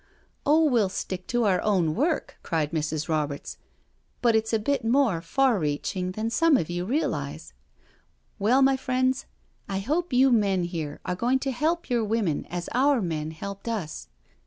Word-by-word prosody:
" - - -42
Oh, 310 +3 +5
we'll 235 -9 +3
stick 185 -1 -5
to 240 -1 +1
our 195 -4 +2
own 185 -7 +2
work," 310 - -1
cried 155 -2 -1
Mrs. 155 -1 -2
Roberts, 150 -3 -2 0.3
" - - -42
but 235 -2 +4
it's 220 0 +1
a 225 - +3
bit 275 +6 -1
more 230 -7 +2
far 250 +5 +2
reaching 180 +4 -2
than 220 +3 -2
some 330 +2 +4
of 165 -4 -2
you 175 +1 -2
realise. 160 - -2 0.9
Well, 245 +7 +4
my 270 0 +4
friends, 255 0 0 0.4
I 195 - -1
hope 305 - -1
you 260 +1 +5
men 200 -6 +2
here 165 -4 -4
are - - -1
going 245 +7 +2
to 270 - -1
help 315 +7 -1
your 240 -3 +1
women 210 -8 -1
as 175 0 -5
our 270 +2 +3
men 160 -6 -2
helped 200 +6 -7
us. 200 - -4
210 Hz, 180 wpm, -26 LUFS, 170-255 Hz, 0.9 s, Oh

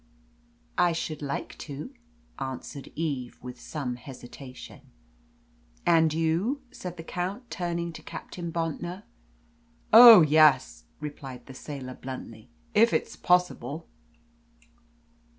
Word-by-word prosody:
"I 175 -1 +4
should 155 -2 -4
like 140 -1 -4
to," 150 - -7 0.5
answered 135 +1 -6
Eve, 140 -6 -3
with 125 -1 -8
some 130 -5 -4
hesitation. 130 0 -11 1.0
"And 165 -2 +5
you?" 165 - 0
said 180 -1 -7
the 165 - -7
Count, 190 +9 -4
turning 170 -1 -3
to 155 - -9
Captain 170 +2 -7
Bontnor. 170 +3 -3 0.9
"Oh 230 -3 +12
yes," 155 -3 +4
replied 140 -4 -8
that 135 - -11
sailor 130 -1 -7
bluntly, 125 -4 -9 0.2
"if 225 +2 +5
it's - - -1
possible." 180 -3 0
155 Hz, 105 wpm, -27 LUFS, 135-175 Hz, 1.0 s, Oh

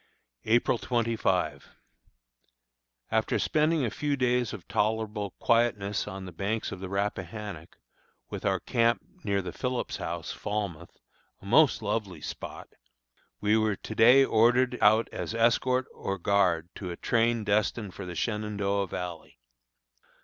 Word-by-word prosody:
April 115 +1 +3
25. 100 - 0 1.4
After - - +1
spending 155 -2 +2
a 110 - -2
few 145 -1 -1
days 125 -3 +1
of 105 -5 -9
tolerable 105 -2 -1
quietness 105 -4 +1
on 95 -2 -6
the 90 - -8
banks 100 +6 -2
of 100 - -6
the 95 0 -6
Rappahannock, 100 -2 -4 0.5
with - - -6
our 95 -2 +1
camp 115 -2 +1 0.2
near 100 -2 0
the 90 - -5
Phillips 125 -1 -2
House, - - -4
Falmouth, 100 -6 -4 0.4
a - - -16
most 125 +3 +4
lovely 105 -2 -2
spot, - - -7 0.7
we 105 +1 +3
were 110 -2 +2
to 110 - -8
day 125 +5 +7
ordered 120 +3 +3
out 110 +2 +5
as - - -4
escort 125 +2 +2
or 100 0 -3
guard 90 -3 +2
to 95 - -6
a 85 - -6
train 115 -1 +1
destined 105 -1 0
for 95 - -7
the 90 - -6
Shenandoah 100 -2 -1
Valley. 90 -6 -6
105 Hz, 135 wpm, -28 LUFS, 100-115 Hz, 1.4 s, day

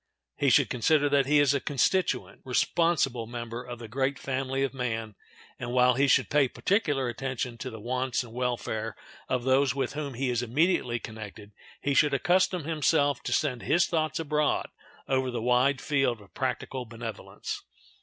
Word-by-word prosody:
He - - +2
should - - +5
consider 145 +4 +2
that 140 -2 +3
he 150 +1 +4
is 145 -1 +4
a 140 - +1
constituent, 155 +8 0
responsible 135 -3 +1
member 120 0 -6
of 120 -1 -7
the 115 -1 -9
great 135 +4 -1
family 135 0 -2
of 135 - -1
man, 115 -4 -3 0.5
and, 120 0 -4
while 125 0 +5
he 140 +3 +2
should - - +3
pay 145 -2 +4
particular 145 - 0
attention 125 0 -3
to 130 - -4
the 110 -2 -9
wants 125 +2 -1
and 115 -2 -12
welfare 115 -3 -2 0.3
of 125 -2 0
those 135 +1 +3
with 135 -3 -1
whom 145 -3 -4
he 130 +1 -1
is 120 -1 0
immediately 125 0 +1
connected, 110 -2 -9 0.3
he 140 - 0
should 145 0 +4
accustom 180 +3 +2
himself 150 -3 +1
to - - -4
send 125 -6 0
his 175 - +3
thoughts 155 -2 -1
abroad 150 -1 0 0.4
over 130 -1 +1
the 120 -1 -3
wide 125 +3 +2
field 135 -6 +1
of 100 -1 -18
practical 130 0 -3
benevolence. 115 -1 -6
130 Hz, 175 wpm, -28 LUFS, 120-145 Hz, 0.5 s, should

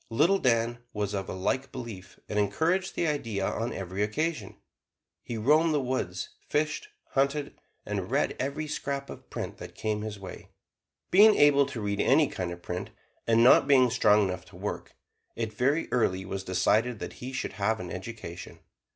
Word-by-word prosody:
Little 175 +12 +3
Dan 120 -3 +1
was 105 -1 -2
of 95 -1 -3
a - - -3
like 130 +9 -1
belief, 95 -7 -8
and 105 - -1
encouraged 160 - +1
the - - 0
idea 115 -10 -1
on 115 +4 -2
every 95 +1 -4
occasion. 120 +1 -2 0.6
He 120 - -5
roamed 155 +8 +4
the - - +3
woods, 125 -9 -2 0.2
fished, 155 - 0 0.2
hunted, 140 +1 0 0.3
and - - -3
read - - +1
every 140 +3 -2
scrap 140 -1 -3
of - - -12
print - - -5
that - - -9
came 105 -1 -2
his 105 -1 -5
way. 95 -1 -9 0.6
Being 210 +3 +8
able 140 -1 +5
to 130 -5 -6
read 100 0 -1
any 145 +3 +4
kind 90 -6 -4
of 85 0 -9
print, 90 +1 -4 0.4
and 115 0 +5
not 125 - +7
being 130 -4 +5
strong 105 -3 +4
enough 90 -1 -4
to 90 - -16
work, 100 +3 -5 0.4
it 110 -2 -3
very 140 +6 +1
early 95 -6 +1
was 95 0 -4
decided 110 +6 +1
that - - -6
he 125 +1 -5
should 135 - -3
have 105 +3 0
an 90 -1 -6
education. 95 -3 -7
115 Hz, 175 wpm, -28 LUFS, 100-140 Hz, 0.6 s, Being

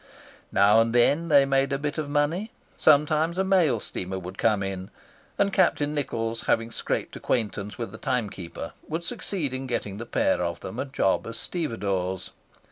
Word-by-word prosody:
Now 105 +3 +6
and 115 +1 0
then 145 +7 +4
they 140 -2 +6
made 135 0 +2
a 140 - +1
bit 145 +2 -3
of 150 -2 -3
money. 155 +9 0 0.3
Sometimes 155 +3 +3
a 190 - +2
mail 180 - +3
steamer 95 -1 -4
would 95 +1 -8
come 105 -3 +2
in, 95 -1 -4 0.5
and 200 -1 +2
Captain 145 -4 +2
Nichols, 115 -6 -2
having 115 0 +1
scraped - - -3
acquaintance 105 -4 -2
with 115 -4 -4
the 110 - -10
timekeeper, 105 -9 -3
would 165 +2 -3
succeed 175 - -3
in 130 0 -4
getting 105 -5 -3
the 115 - -6
pair - - +1
of 85 -1 -2
them 115 - -6
a - - -1
job 130 -9 0
as 115 0 -4
stevedores. 100 - -2
125 Hz, 175 wpm, -26 LUFS, 105-150 Hz, 0.5 s, Now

